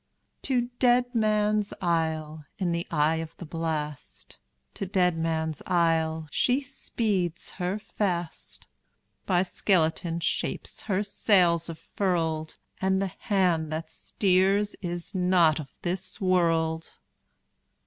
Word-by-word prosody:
To 255 -3 +1 0.2
Deadman's 215 -4 +2
Isle, 160 -3 -1
in 180 -3 0
the 170 0 -2
eye 155 0 +2
of 165 0 -6
the 175 - -8
blast, 155 -3 -5 0.3
To 195 - -4
Deadman's 165 -4 0
Isle, 160 -2 +1
she 250 +2 +2
speeds 210 - -2
her 185 +2 -2
fast; 180 -5 -3 0.6
By 180 -1 +3
skeleton 170 -3 0
shapes - - -2
her 195 +1 +2
sails 180 -5 +2
are 165 - -4
furled, 160 -4 -2 0.2
And 190 0 +2
the 195 -1 -1 0.2
hand 175 -6 +2
that 160 0 -4
steers 195 +3 +1
is 175 -2 -5
not 180 -4 +3
of 145 -3 -7
this 180 +2 -3
world! 165 -3 +1
175 Hz, 110 wpm, -27 LUFS, 160-195 Hz, 0.6 s, By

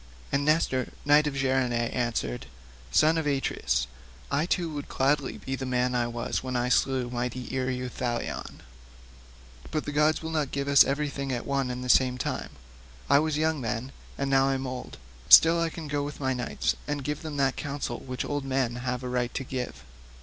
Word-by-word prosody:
And 140 0 +1
Nestor, 145 -4 +1
knight 150 +1 +5
of 145 - -2
Gerene, 130 -2 +1
answered, 120 - -1 0.4
"Son 160 +1 +4
of 155 - -2
Atreus, 65 - 0 0.5
I 145 +4 +1
too 170 -3 0
would 145 -1 -6
gladly 140 +1 +1
be 135 - -4
the 135 - -5
man 125 0 +1
I 120 -1 +1
was 120 0 -2
when 130 -1 -4
I 125 0 +1
slew 130 -1 +1
mighty 125 +1 -3
Ereuthalion; 125 -2 -3 1.1
but 155 -1 -2
the 145 - -3
gods 150 +2 +2
will 160 - -4
not 155 -4 0
give 140 0 -2
us 140 -1 +8
everything 140 -1 -2
at 120 -2 -3
one 135 -2 0
and 125 0 -4
the - - -4
same 125 0 +4
time. - - -3 0.6
I 140 - +7
was 155 0 0
then 155 -1 +1
young, 115 +3 -3 0.3
and 140 - -1
now 135 0 +4
I 135 - +1
am 135 0 -3
old; 130 -1 -6 0.3
still 165 - +9
I 165 - +1
can 160 -1 -7
go 145 0 -1
with 145 +1 -5
my 130 -2 0
knights 125 -2 -1
and 145 -1 -2
give 150 +2 -3
them 155 -3 -5
that 135 -1 +2
counsel 140 -4 -4
which 130 -1 -5
old 145 -1 -2
men 130 -3 0
have 125 0 -3
a - - -3
right 125 -1 -1
to 135 - -2
give. 125 - -5
135 Hz, 195 wpm, -27 LUFS, 125-145 Hz, 1.1 s, still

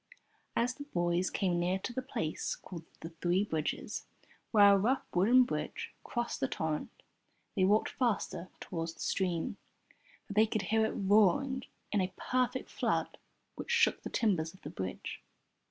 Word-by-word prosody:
As 245 +2 +2
the 285 +3 -9
boys 175 -6 +1
came 180 -3 0
near 180 +2 +1
to 215 +5 -5
the 260 - -2
place 160 - -2
called 170 -3 -9 0.2
"The 165 - -6
Three 175 +3 +1
Bridges," 160 -7 -3 0.4
where 205 -3 +7
a - - +6
rough 250 +7 +1
wooden 230 +8 +6
bridge 245 - -4
crossed 240 -1 -2
the 135 - +1
torrent, 155 +1 -2 0.7
they 190 -3 +4
walked 210 +3 +3
faster 215 -7 -1
towards 165 -2 -4
the - - -22
stream, 175 -4 -1 0.7
for - - -7
they 215 +2 +5
could 215 -1 -1
hear 220 +4 +2
it - - -4
roaring 210 +6 +3 0.3
in 205 - +2
a 185 0 -1
perfect 255 0 -1
flood - - -1 0.3
which - - -8
shook 470 -1 +3
the - - -5
timbers 180 -7 +1
of - - -20
the - - -6
bridge. 95 -1 -5
195 Hz, 165 wpm, -32 LUFS, 175-235 Hz, 0.7 s, where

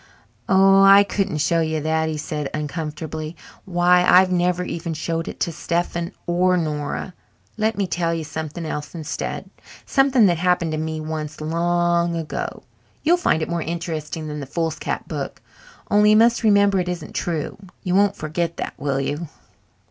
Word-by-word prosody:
"Oh, 195 0 +6
I 195 +1 +8
couldn't 200 -4 -1
show 165 +3 +2
you 160 -1 -1
that," 160 +1 0
he 155 - -3
said 150 -1 -4
uncomfortably. 155 +1 -5 0.3
"Why, 180 -1 +4
I've 185 +1 +6
never 180 0 +1
even 170 -2 -4
showed 165 +1 -2
it - - -7
to 170 - +1
Stephen 170 +1 -2
or 180 +1 +2
Nora. 155 +2 -3 0.4
Let 220 0 0
me 200 - +1
tell 170 -2 -1
you 165 -1 -2
something 160 +2 -5
else 150 +1 -5
instead, 160 -3 -5 0.3
something 270 -4 +4
that 175 -4 +2
happened 180 -2 +1
to 155 - -2
me 160 0 -3
once 155 -1 -5
long 170 +2 +1
ago. 165 -2 -4 0.4
You'll 340 +3 +4
find 160 - +1
it - - -4
more 170 -1 -1
interesting 160 -1 -4
than 150 0 -5
the 140 - -6
foolscap 160 +1 -3
book, - - -5 0.5
only 210 0 +5
you 215 - +6
must 235 +1 +4
remember 200 -3 +4
it 180 0 -1
isn't 175 -3 -5
true! 165 +1 -3 0.2
You 180 - -1
won't 200 +1 +3
forget 165 +2 -3
that, - - -4
will 140 -2 -1
you?" 145 +4 -3
170 Hz, 170 wpm, -22 LUFS, 155-180 Hz, 0.5 s, I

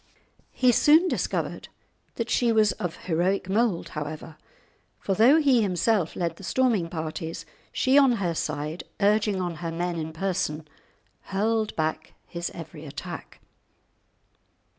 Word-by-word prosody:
He 255 -1 +3
soon 310 +8 +5
discovered - - -2 0.5
that 230 - -2
she 240 0 +2
was 215 -2 +4
of 175 -2 -6
heroic 185 +3 0
mould, 205 -2 +1
however, 155 +1 -6 0.6
for 195 - -1
though 235 +10 +6
he 270 -6 +4
himself 190 -2 +1
led 170 -2 -2
the - - -12
storming 225 -6 +1
parties, 160 0 -5 0.3
she 265 +1 +4
on 270 -3 +5
her 190 -7 -1
side, 150 +1 -3 0.2
urging 210 -1 +2
on 175 -3 -3
her 165 +1 -4
men 175 +1 -2
in 160 0 -4
person, 160 -3 -2 0.6
hurled 215 +2 0
back 155 0 -2
his 170 -1 -4
every 165 -2 -9
attack. 145 - -8
185 Hz, 135 wpm, -26 LUFS, 165-225 Hz, 0.6 s, though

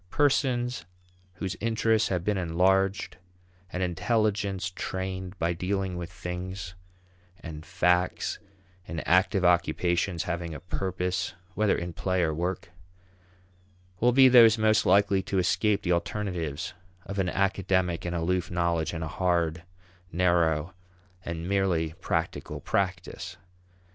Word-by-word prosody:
Persons 125 -2 +1 0.5
whose 95 +2 -4
interests 110 -1 +2
have 90 -3 -1
been 105 +2 +1
enlarged 95 +4 +1 0.5
and 90 - -2
intelligence 100 0 0
trained 95 0 -4
by 85 +1 0
dealing 95 +1 -2
with 90 0 -6
things 90 0 -6 0.7
and 80 -2 -8
facts 90 +1 +1 0.5
in 80 -2 -4
active 90 +2 +3
occupations 85 0 +2
having 85 -2 -4
a - - -6
purpose 90 +1 -2 0.2
(whether 105 +1 +2
in 85 0 -4
play 95 +1 0
or 80 -2 +1
work) 90 +3 -3 1.3
will 120 +2 +4
be 130 +1 +7
those 115 -3 +8
most 110 0 +3
likely 100 -1 +4
to 95 - -3
escape 100 +3 +2
the 90 - 0
alternatives 85 -4 -2 0.3
of 100 0 -4
an 95 -2 +1
academic 95 -2 0
and 85 0 -3
aloof 85 +1 0
knowledge 85 -2 0
and 80 -1 -3
a - - -3
hard, 85 -1 0 0.5
narrow, 85 -1 +2 0.5
and 85 0 -5
merely 90 -5 +1
"practical" 85 -3 -2
practice. 90 -1 -2
90 Hz, 125 wpm, -27 LUFS, 85-100 Hz, 1.3 s, those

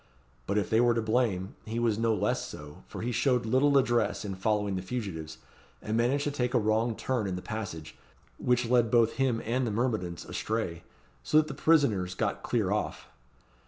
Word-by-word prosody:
But 100 - 0
if 100 - -1
they 110 +1 +4
were 120 -1 +4
to 115 - +1
blame, 110 -5 0
he 110 +1 -5
was 115 -2 +1
no 115 0 +2
less 105 +1 -1
so, 75 0 -10
for - - -7
he 120 - -1
showed 125 0 +1
little 135 +5 +3
address 120 -4 +1
in 100 - -3
following 105 +1 0
the 95 - -2
fugitives, 90 -7 -5 0.4
and 110 - -3
managed 125 +5 +2
to 145 - -1
take 125 -2 -1
a - - +5
wrong 110 +2 +1
turn 120 -4 -1
in 95 - -2
the 90 - -5
passage, 100 -9 -6 0.4
which 125 0 +2
led 120 -1 +3
both 115 -1 +3
him 125 -4 +1
and 125 +2 0
the - - 0
myrmidons 105 -7 -2
astray, 100 -7 -3 0.4
so 155 - +2
that 155 0 +5
the 150 - -5
prisoners 120 - +2
got - - -1
clear - - 0
off. - - -2
115 Hz, 195 wpm, -29 LUFS, 100-125 Hz, 0.4 s, a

